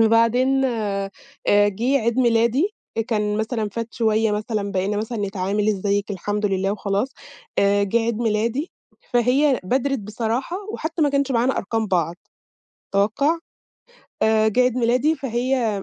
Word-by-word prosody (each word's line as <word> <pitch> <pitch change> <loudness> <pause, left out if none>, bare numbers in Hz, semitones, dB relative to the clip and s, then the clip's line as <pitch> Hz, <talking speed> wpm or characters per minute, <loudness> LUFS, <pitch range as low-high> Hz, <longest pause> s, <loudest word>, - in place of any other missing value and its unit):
وبعدين 235 +4 +3
آآ، 205 -5 -1 0.4
جِه 205 +7 +3
عيد 235 +2 0
ميلادي، 245 - +2 0.3
كان 210 -2 0
مثلًا 220 0 -1
فات 230 +2 -6
شويّة 220 -2 +2
مثلًا 210 -1 -2
بقينا 195 +2 0
مثلًا 220 +2 -3
نتعامل 200 +1 -1
"إزيك؟" 205 0 0
"الحمد 205 +2 -2
لله." 195 0 0
وخلاص، 205 +3 -1 0.5
آآ، 200 0 +3
جِه 200 +4 +2
عيد 230 -1 -1
ميلادي 230 +6 0 0.4
فهي 250 +3 +3
بادرِت 270 +6 0
بصراحة، 230 - -3 0.2
وحتّى 320 0 -2
ما 290 - +4
كانش 280 -1 +1
معانا 245 +2 +1
أرقام 220 +2 -1
بعض، 175 -2 0 0.8
توقَّع. 250 +12 +2 0.8
آآ، 220 0 +4
جِه 230 +4 +1
عيد 250 -1 +2
ميلادي 250 +6 +2
فهي 240 -5 -1
225 Hz, 135 wpm, -22 LUFS, 205-250 Hz, 0.8 s, ما